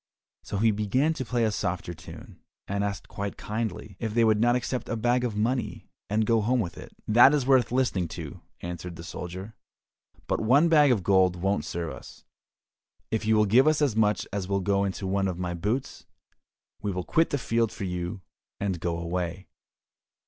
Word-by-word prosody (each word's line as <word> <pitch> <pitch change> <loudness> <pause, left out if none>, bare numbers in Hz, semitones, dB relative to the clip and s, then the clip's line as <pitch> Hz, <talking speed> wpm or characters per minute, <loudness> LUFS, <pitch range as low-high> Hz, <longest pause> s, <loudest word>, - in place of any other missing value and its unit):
So 100 - -5
he 110 +2 +4
began 105 +9 +1
to 155 - -4
play 120 -1 0
a 110 - +2
softer 90 -3 -3
tune, 85 0 -12 0.3
and 100 +1 -1
asked 100 -2 -3
quite 100 0 -5
kindly, 105 -2 -4
if 110 -1 -3
they 115 - +4
would 110 -2 +4
not 120 +1 +4
accept 125 0 -2
a 120 - -1
bag 120 +2 +2
of 120 -4 -2
money, 120 +4 -2 0.2
and 110 +2 +1
go 115 0 +3
home 125 +4 +1
with 85 -7 -3
it? - - -10 0.2
"That 120 +6 +7
is 140 -4 0
worth 130 -3 +4
listening 120 -9 +1
to," 80 -4 -7 0.2
answered 85 0 -6
the 85 - -9
soldier, 90 +5 -7 0.7
"but - - -1
one 140 +9 +4
bag 150 -4 +6
of 105 -7 +1
gold 95 -1 +4
won't 95 -2 -1
serve 85 -2 -4
us, - - -12 0.9
if 110 -1 -1
you 110 - +4
will 105 0 +4
give 125 +8 +5
as 150 -6 +2
much 105 -1 +2
as 100 -2 -2
will 100 0 0
go 100 +1 +1
into 95 0 -4
one 95 +1 +1
of 90 -2 -3
my 90 -1 -3
boots, 105 +10 -3 0.7
we 105 -1 -1
will 90 -1 -3
quit 165 - +2
the 145 - 0
field 115 -3 0
for - - -7
you 90 +1 -4 0.4
and 95 -4 -1
go 85 0 -2
away." 85 +2 -4
105 Hz, 195 wpm, -27 LUFS, 90-120 Hz, 0.9 s, That